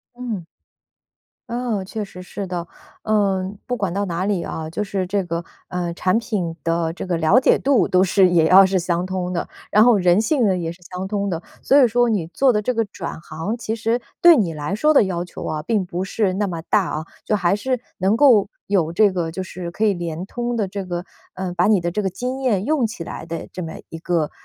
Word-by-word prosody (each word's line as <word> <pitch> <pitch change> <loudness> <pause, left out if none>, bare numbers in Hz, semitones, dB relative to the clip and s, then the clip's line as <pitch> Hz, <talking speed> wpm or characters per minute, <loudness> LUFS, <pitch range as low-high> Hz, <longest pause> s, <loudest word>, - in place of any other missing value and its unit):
嗯。 235 -8 -5 1.0
嗯， 235 -4 -2
确 210 +3 -4
实 185 -2 -11
是 195 +2 -6
的。 175 -2 -4 0.4
呃， 195 -3 +1
不 250 - -1
管 195 -6 -2
到 200 +2 -1
哪 175 -1 -2
里 195 -3 0
啊， 160 0 -5
就 210 +6 -2
是 195 -2 -2
这 195 +1 -1
个， 170 0 -3 0.2
呃， 175 -1 -3
产 185 +3 +1
品 200 -8 -3
的 165 0 0
这 175 - -6
个 180 -2 -1
了 165 +9 +4
解 - - +4
度 270 -4 +2
都 185 +1 +4
是 190 0 +4
也 165 -2 +4
要 190 +4 +8
是 190 0 +2
相 175 0 -1
通 185 -1 -3
的， 175 - -2 0.2
然 210 - +5
后 240 -3 +5
人 180 +1 +4
性 245 +1 +2
呢 190 -2 +2
也 170 -2 -3
是 170 +2 -11
相 180 +2 -6
通 200 -1 -1
的。 170 -2 -3 0.2
所 280 +1 +5
以 250 - +5
说 240 +2 +2
你 195 -8 0
做 260 +8 +3
的 210 -2 0
这 250 - 0
个 230 -2 0
转 190 -5 -7
行， 165 +7 -4
其 220 -1 -3
实 230 +2 0 0.2
对 345 -1 +8
你 185 - 0
来 150 +5 -3
说 305 +8 +3
的 - - +7
要 175 -2 -2
求 180 - -9
啊， 155 -1 -3
并 205 +3 0
不 180 +1 -3
是 195 0 0
那 205 +2 0
么 170 -4 -5
大 200 +4 +2
啊， 155 +1 -3 0.2
就 - - 0
还 195 -1 +2
是 255 +3 -1 0.2
能 195 +4 +2
够 235 -7 +5 0.2
有 175 -5 +1
这 205 +4 +4
个 170 -3 -2
就 190 - -4
是 180 -2 -6
可 215 - -1
以 210 - +4
连 170 -1 -4
通 240 +3 -3
的 210 -4 0
这 195 +1 -5
个 175 -1 -4 0.3
呃， 185 -1 -4
把 180 0 +2
你 210 -3 +4
的 175 0 -1
这 210 +5 -2
个 195 - 0
经 250 +8 -4
验 210 -7 +1
用 285 -2 +2
起 220 -5 -7
来 165 - -7
的 165 0 -6
这 185 - -5
么 160 - -6 0.2
一 165 - -8
个， 165 -2 0
190 Hz, 255 characters per minute, -21 LUFS, 175-215 Hz, 1.0 s, 要